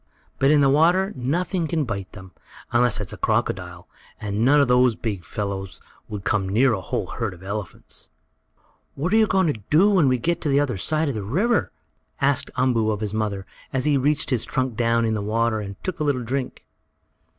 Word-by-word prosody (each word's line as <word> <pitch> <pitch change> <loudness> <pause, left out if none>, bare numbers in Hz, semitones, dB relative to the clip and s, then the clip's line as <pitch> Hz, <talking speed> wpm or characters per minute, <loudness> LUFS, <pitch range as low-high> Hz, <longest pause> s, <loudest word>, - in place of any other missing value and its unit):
But 135 - +4
in 150 -1 +5
the 140 - +4
water 175 +7 +3
nothing 170 +7 -1
can 160 -1 0
bite 100 -7 -5
them, 95 -3 -11 0.4
unless 120 -2 +2
it's 105 - -5
a - - -8
crocodile, - - -2 0.3
and 105 +1 -2
none 145 +4 +5
of 140 - +4
those 125 -1 +4
big 105 -6 -4
fellows 95 -1 -5 0.3
would 105 -3 -6
come 100 -2 0
near 120 +5 +3
a 95 - -2
whole - - -3
herd - - -4
of 90 - -16
elephants. 100 -1 -7 0.9
"What 165 +8 -2
are - - +5
we 220 -1 +4
going 185 -5 +2
to 110 - -11
do 185 +8 +5
when 180 -8 +4
we 130 -1 +3
get 170 +8 -1
on 150 - 0
the 140 - +4
other 135 -7 0
side 155 - 0
of - - -2
the 110 - -4
river?" 190 - 0 0.5
asked 140 -2 +1
Umboo 125 -4 +2
of 105 -1 -2
his 105 -1 -2
mother, 105 -3 -2 0.3
as 130 -1 -1
he 150 -1 +3
reached 145 +2 +1
his 120 -4 +2
trunk 130 -3 -2
down 115 0 +2
in 110 - 0
the 105 - -2
water 110 +2 0
and 100 -1 -6
took 185 -3 -4
a - - 0
little 140 -4 0
drink. 130 +2 -4
125 Hz, 210 wpm, -23 LUFS, 105-150 Hz, 0.9 s, in